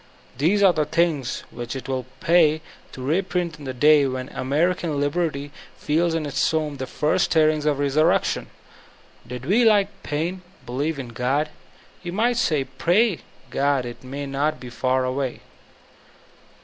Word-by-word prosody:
These 175 +10 +2
are 190 -2 +6
the 155 -2 +1
things 150 -4 0
which 120 +1 -6
it 135 - -6
will 130 -1 -3
pay 160 -2 +4 0.3
to 130 - -8
reprint 175 +1 -1
in 145 - -10
the 130 - -3
day 145 +1 +5
when 130 0 -4
American 155 +3 0
liberty 145 -1 -1 0.3
f - - -19
eeb 165 +2 +2
in 160 -2 -1
its 145 - +1
tomb 155 -3 -1
the 130 0 -4
first 150 +4 +1
stirrings 155 -1 +2
of 145 -2 +2
the 145 - -1
resurrection. 145 +3 +2 0.8
Did 125 0 -7
we 215 - +3
like 205 -3 +4
Paine 165 +5 -3 0.2
believe 145 +6 -2
in 130 -3 -6
God, 130 +6 0 0.5
we 175 - -5
might 230 +6 +1
say 155 - +1
'Tray 195 +2 +3 0.3
God 140 -1 +1
it 120 +1 -8
may 140 +3 -5
not 140 +2 -1
be 125 -1 -9
far 130 +1 0
away." 130 0 -2
150 Hz, 160 wpm, -23 LUFS, 135-170 Hz, 0.8 s, are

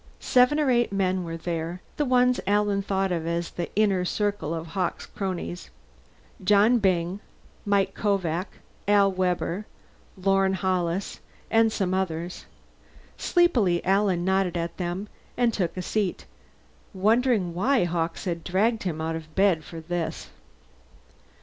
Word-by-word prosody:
Seven 255 +4 +4
or 290 -4 +2
eight 240 -3 +2
men 190 -2 0
were 165 -1 -5
there 165 +1 -4 0.2
the 295 - +1
ones 250 -1 +3
Alan 205 0 +2
thought 195 -1 -1
of 165 -2 -2
as 170 0 -2
the 175 - -4
inner 200 -3 +2
circle 205 -3 -1
of 165 -1 -3
Hawkes' 180 +1 -2
cronies. 185 -2 -5 0.7
Johnny 210 +5 +5
Byng, 185 -1 +1 0.5
Mike 200 -1 +2
Kovak, 185 -3 0 0.4
Al 200 -1 +5
Webber, 185 +1 -1 0.5
Lorne 195 0 +2
Hollis, 185 0 -1 0.3
and 225 0 +4
some 190 -4 -1
others. 175 -2 -3 0.7
Sleepily 235 - +2
Alan 190 -2 +2
nodded 190 -2 +1
at 170 0 -3
them 180 +3 -3 0.3
and 240 -2 +2
took 185 -3 -2
a 185 - -3
seat, 205 -1 -2 0.7
wondering 215 -2 +2
why 235 +8 +2
Hawkes 170 0 -2
had 170 -3 -3
dragged 215 +6 +1
him 165 -4 -3
out 160 0 -2
of 155 -1 -9
bed 190 -5 +3
for 165 +1 -9
this. 170 0 -4
190 Hz, 135 wpm, -26 LUFS, 175-205 Hz, 0.7 s, Johnny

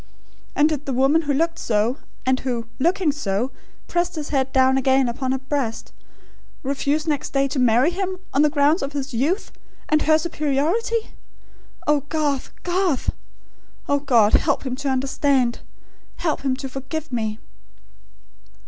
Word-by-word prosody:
And 295 - +5
did 300 -2 -3
the 270 - -1
woman 270 +6 +3
who 290 -3 -1
looked 330 +3 0
so; 225 +4 +1 0.3
and 260 0 +2
who, 240 -3 -2
looking 345 +2 +2
so, 245 -3 -2 0.4
pressed 350 0 0
his 300 -2 -4
head 265 -2 0
down 265 0 +4
again 265 0 +3
upon 260 +2 -2
her 265 - +1
breast, 265 -4 -3 0.7
refuse 280 +3 0
next 300 -3 -2
day 275 0 +2
to 270 - -2
marry 250 +5 +4
him, 375 0 -3 0.2
on 275 - +4
the 300 - +5
grounds 295 +3 +3
of 275 +1 -3
his 280 -1 -4
youth, 295 - 0 0.4
and 305 0 +3
her 310 0 +4
superiority?... 330 +9 0 0.7
Oh, 295 -1 +3
Garth, 295 -4 -1
Garth!... 355 -5 +1 0.8
O 285 - +2
God, 240 -7 +4
help 285 -2 +2
him 255 -1 -2
to 280 0 -2
understand!... 265 -1 +1 0.6
help 320 -3 -1
him 270 -2 0
to 270 - -5
forgive 275 +4 -5
me!" 220 -3 -2
280 Hz, 155 wpm, -22 LUFS, 260-310 Hz, 0.8 s, And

